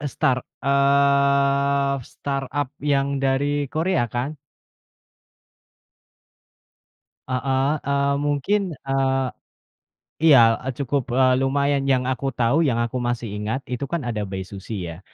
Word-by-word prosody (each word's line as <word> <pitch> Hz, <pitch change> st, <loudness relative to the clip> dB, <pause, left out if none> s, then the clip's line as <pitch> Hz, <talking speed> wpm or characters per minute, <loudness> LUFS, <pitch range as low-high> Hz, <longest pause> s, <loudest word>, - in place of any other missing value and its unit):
Eee, 145 Hz, -, -3 dB
Start, 130 Hz, 0 st, 0 dB, 0.2 s
eee, 140 Hz, 0 st, +3 dB, 0.2 s
Start-Up 140 Hz, 0 st, -3 dB
yang 140 Hz, -1 st, 0 dB
dari 140 Hz, +1 st, 0 dB
Korea 160 Hz, 0 st, 0 dB
kan? 130 Hz, +6 st, -4 dB, 2.9 s
Heeh, 130 Hz, +1 st, 0 dB, 0.2 s
eee, 140 Hz, 0 st, +1 dB
mungkin, 145 Hz, +8 st, 0 dB, 0.2 s
eee, 135 Hz, -1 st, 0 dB, 1.0 s
iya, 145 Hz, -5 st, +8 dB, 0.2 s
eee, 130 Hz, -, -4 dB
cukup, 140 Hz, -1 st, -2 dB
eee, 130 Hz, -1 st, +4 dB
lumayan 140 Hz, +1 st, +1 dB
yang 130 Hz, -2 st, +2 dB
aku 130 Hz, +2 st, -2 dB
tahu, 125 Hz, +8 st, +2 dB
yang 120 Hz, -, +1 dB
aku 120 Hz, +2 st, -3 dB
masih 120 Hz, -3 st, -2 dB
ingat 105 Hz, +6 st, -3 dB
itu 125 Hz, +2 st, -3 dB
kan 170 Hz, +3 st, -3 dB
ada 110 Hz, -4 st, -3 dB
Bae 95 Hz, 0 st, -5 dB
Suzy, 95 Hz, -1 st, -6 dB
ya. 80 Hz, -, -10 dB
135 Hz, 120 wpm, -23 LUFS, 125-140 Hz, 2.9 s, iya